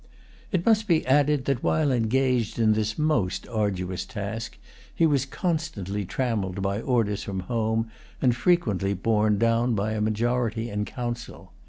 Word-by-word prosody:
It 185 -4 0
must 220 -1 +3
be 165 -4 +2
added 145 0 +3
that, 135 -3 0
while 155 -3 +2
engaged 125 -1 +1
in 110 -2 +4
this 105 0 -1
most 150 -12 0
arduous 95 -5 -1
task, 110 +2 -5 0.4
he 165 - +3
was 140 -4 +2
constantly 135 - -2
trammelled 100 -5 -2
by 100 +2 -1
orders 115 -6 0
from 95 -2 -4
home, 110 +2 -1 0.3
and 125 -3 +3
frequently 110 - +1
borne 105 +1 +2
down 115 +2 +2
by 105 +2 -1
a 110 -1 -2
majority 115 +1 0
in 105 0 -1
Council. 120 0 -6
115 Hz, 150 wpm, -26 LUFS, 105-130 Hz, 0.4 s, in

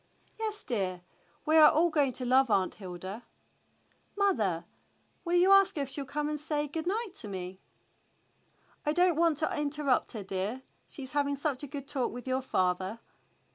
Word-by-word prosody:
"Yes, 430 -2 -3
dear. 190 -8 -2 0.4
We 315 +1 +4
are 305 -1 +9
all 335 +2 +3
going 285 -4 +2
to 250 - -4
love 260 +1 +4
Aunt 190 -3 +2
Hilda." 190 +3 -7 0.9
"Mother, 210 - +1 0.6
will 345 0 0
you 360 +2 +5
ask 390 -1 +6
her 290 - 0
if 270 - -7
she'll 280 0 -3
come 295 +2 -2
and 300 0 -3
say 300 0 -2
good 320 +3 -4
night 420 0 -1
to - - -8
me.^" 185 -1 -6 1.2
"I 300 - +1
don't 355 0 +3
want 330 -2 +3
to 310 - -1
interrupt 295 -3 0
her, 215 -3 -5
dear. 195 +7 -3 0.2
She's 265 -4 -8
having 285 -1 +1
such 280 -2 -2
a 290 - -5
good 280 0 -7
talk 265 -4 -1
with 245 0 -8
your 260 0 0
father." 185 -2 0
280 Hz, 175 wpm, -30 LUFS, 215-310 Hz, 1.2 s, are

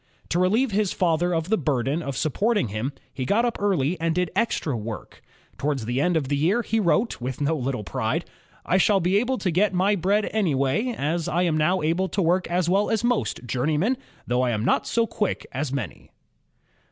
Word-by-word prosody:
To 175 - +1
relieve 215 +8 +2
his 205 -1 +1
father 175 0 +1
of 165 0 -1
the 220 - +2
burden 140 +1 0
of 140 -4 -4
supporting 200 - +1
him, 110 +7 -3 0.2
he 130 - -3
got 210 - +2
up 240 - -1
early 180 -5 +1
and 165 0 0
did 180 -1 0
extra 195 - 0
work. 110 -1 -7 0.4
Towards 140 -5 -1
the 120 +4 0
end 175 +1 +2
of 145 -4 -1
the 145 - 0
year 180 +12 +2
he 225 - 0
wrote, 210 - +1
with 125 +1 -4
no 150 +2 +1
little 130 -5 -2
pride: 85 - -2 0.4
"I 185 - +2
shall 200 +1 +4
be 185 +2 +2
able 250 +4 +1
to 185 - -1
get 190 +3 +2
my 195 +3 +3
bread 200 +3 +1
anywhere, 195 - +1
as 165 +4 -1
I 170 +2 +1
am 170 -3 +1
now 155 +3 +2
able 175 +4 +1
to - - -3
work 180 +1 +2
JAMES - - -11
WATT - - -2
II - - +2
as 175 -2 +1
well 200 +3 +2
as 225 0 0
most 240 - 0
journe3maen, 150 - +1 0.3
though 125 +1 +1
I 125 - +1
am 110 -1 -1
not - - +2
so 230 0 +2
quick 210 -3 -2
as 135 +1 -3
many." 140 -2 -5
170 Hz, 220 wpm, -24 LUFS, 140-200 Hz, 0.4 s, shall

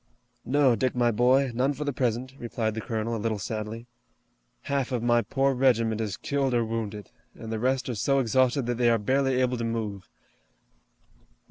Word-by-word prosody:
"No, 135 -2 +3
Dick, 130 +1 -1
my 120 -1 +3
boy, 125 +4 +3
none 130 +4 +1
for 145 +2 -5
the 145 -1 -2
present," 125 +1 -1
replied 115 -2 -2
the 110 - -4
colonel, 115 +1 -2
a 110 - -4
little 110 -1 -1
sadly. 110 +3 -5 0.8
"Half 140 -2 -2
of 120 -2 -1
my 120 0 +3
poor 135 +2 +1
regiment 115 -4 +2
is 105 -4 -3
killed 135 -3 -1
or 120 -1 +2
wounded, 110 -3 -5 0.2
and 110 - -8
the 110 - -2
rest 130 +2 0
are 125 - -2
so 135 +5 +1
exhausted 130 +1 +2
that 120 0 -2
they 120 -1 +4
are 115 - +4
barely 130 +4 +1
able 125 -1 +1
to 115 - -3
move. 110 -4 -4
120 Hz, 190 wpm, -27 LUFS, 110-130 Hz, 0.8 s, they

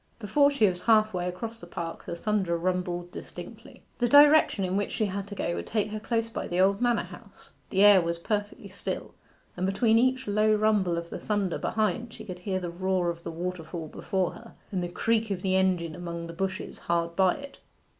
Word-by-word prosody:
Before 260 +7 +3
she 280 -7 +3
was 180 -1 -2
half 215 -2 +4
way 180 -1 -2
across 220 +6 -5
the 175 - -11
park 170 -1 -6
the 170 - -4
thunder 190 -2 0
rumbled 175 0 -2
distinctly. - - -10 0.2
The 240 -1 +2
direction 290 -7 +6
in 185 +1 -2
which 205 0 -1
she 215 - +1
had 200 0 -4
to 205 - -7
go 170 - -2
would - - -5
take 215 -1 -1
her 215 - -3
close 230 +1 -1
by 225 - -5
the 175 - -2
old 195 +3 +3
manor 240 -1 +2
house. - - -14 0.2
The 195 +1 +3
air 205 -2 +8
was 170 0 -2
perfectly 205 +4 -3
still, - - -5 0.4
and 180 - -4
between 220 +3 +3
each 260 +1 +2
low 215 +1 +3
rumble 210 -5 +2
of 170 0 -5
the - - -5
thunder 205 -4 -1
behind 225 +2 -1
she 220 - -10
could 180 -3 -7
hear 185 0 -2
the 175 -2 -5
roar 185 0 0
of 170 0 -10
the - - -5
waterfall 165 -1 -5
before 190 +2 -1
her, 230 - -13 0.2
and 190 -3 -1
the 175 - -3
creak 225 +4 0
of 190 -3 -3
the 190 -1 +1
engine 180 -4 +1
among 170 0 -6
the 165 - -8
bushes 190 +2 -4
hard 170 0 -1
by 190 -1 +4
it. 280 0 -10
190 Hz, 215 wpm, -27 LUFS, 175-215 Hz, 0.4 s, air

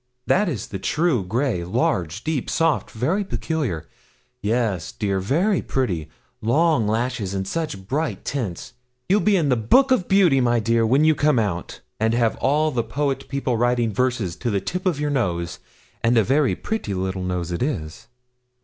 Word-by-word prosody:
'That 205 0 +2
is 125 - -4
the 95 - -5
true 150 - +1
grey 110 -1 -1
large, 90 +1 -1
deep, 155 -5 -2
soft 165 -2 +1
very 160 - 0
peculiar. 140 - -3 0.5
Yes, 105 -6 -1
dear, 100 -3 -1
very 170 - +1
pretty 90 - -2 0.3
long 145 0 +2
lashes, 110 -3 -1
and 95 0 -2
such 150 - -4
bright 150 +7 -2
tints! 120 -6 -4 0.3
You'll 200 +3 +4
be 210 -1 +3
in 155 -5 +1
the 125 - +4
Book 260 - +4
of 240 -9 +2
Beauty, 180 -9 +4
my 120 -1 +2
dear, 115 0 +2
when 135 +6 +4
you 155 - +5
come 150 -2 +2
out, 100 -6 -2 0.2
and 110 +1 +2
have 115 -2 +2
all 150 +3 +2
the 125 -4 0
poet 135 +5 -2
people 135 -3 -1
writing 120 -1 +1
verses 120 -8 0
to 120 - -2
the 100 -3 +1
tip 180 - -3
of 165 -6 0
your 150 0 -1
nose 85 - -1 0.4
and 120 +1 +3
a 110 - +5
very 135 +4 +2
pretty 210 - -3
little 95 0 -2
nose 90 -1 -2
it 85 - -3
is!' 95 - -3
120 Hz, 175 wpm, -22 LUFS, 100-150 Hz, 0.5 s, you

